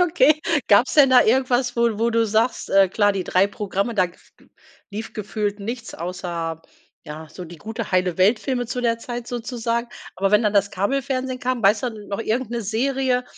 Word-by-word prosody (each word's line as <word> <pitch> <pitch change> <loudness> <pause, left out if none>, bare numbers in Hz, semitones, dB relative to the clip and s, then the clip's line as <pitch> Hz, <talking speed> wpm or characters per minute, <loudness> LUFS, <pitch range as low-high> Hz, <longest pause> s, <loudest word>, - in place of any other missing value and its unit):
Okay, 310 -4 +4 0.3
gab's 215 +5 +4
denn 280 -3 +6
da 255 - +7
irgendwas, 245 +1 +2
wo 235 -3 +1
wo 230 +1 +1
du 230 0 +2
sagst, 220 +4 0
äh, 195 -1 +5
klar, 205 +1 +2
die 190 -2 -3
3 185 +2 +3
Programme, 205 +2 -3
da 185 -4 +3
gef 175 - -20 0.6
lief 215 +2 -6
gefühlt 210 0 -3
nichts 235 +4 -6
außer, 170 -2 -5 0.4
ja, 155 +1 -9
so 180 - -9
die 170 0 -11
gute, 220 +7 -6
heile 185 -1 +1
Welt 210 +5 +4
Filme 250 -1 -2
zu 250 +2 -3
der 230 -1 0
Zeit 240 0 -6
sozusagen. 235 -1 -3 0.3
Aber 195 +1 +1
wenn 210 +2 +4
dann 210 - +1
das 200 -1 +2
Kabelfernsehen 255 +5 -2
kam, 250 -2 -2
weißt 210 +4 +3
du 245 - -1
da 220 - -11
noch 200 +2 -3
irgend 230 +2 -2
'ne 235 0 -2
Serie, 250 +3 0
225 Hz, 195 wpm, -22 LUFS, 195-245 Hz, 0.6 s, da